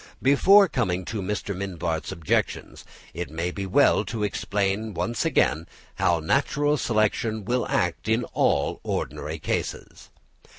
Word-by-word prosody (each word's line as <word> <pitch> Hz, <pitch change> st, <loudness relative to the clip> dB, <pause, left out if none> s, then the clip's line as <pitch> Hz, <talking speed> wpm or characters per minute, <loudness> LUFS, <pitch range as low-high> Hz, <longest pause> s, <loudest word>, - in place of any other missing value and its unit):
Before 195 Hz, +9 st, +6 dB
coming 95 Hz, -, -1 dB
to 110 Hz, +1 st, -4 dB
Mr. 100 Hz, 0 st, -3 dB
Mivart's 85 Hz, -4 st, -3 dB
objections, 80 Hz, -3 st, -2 dB, 0.3 s
it 85 Hz, +2 st, -5 dB
may 85 Hz, +3 st, -3 dB
be 95 Hz, +1 st, -5 dB
well 95 Hz, -, +4 dB
to 110 Hz, -2 st, -3 dB
explain 100 Hz, 0 st, -1 dB
once 90 Hz, +7 st, -2 dB
again 80 Hz, +3 st, +1 dB, 0.3 s
how 85 Hz, -1 st, +2 dB
natural 145 Hz, -, +1 dB
selection 110 Hz, -2 st, 0 dB
will 125 Hz, +3 st, 0 dB
act 80 Hz, 0 st, -1 dB
in 110 Hz, +2 st, +2 dB
all -, -, +1 dB
ordinary 75 Hz, +2 st, -4 dB
cases. -, -, -4 dB
100 Hz, 130 wpm, -25 LUFS, 85-115 Hz, 0.3 s, Before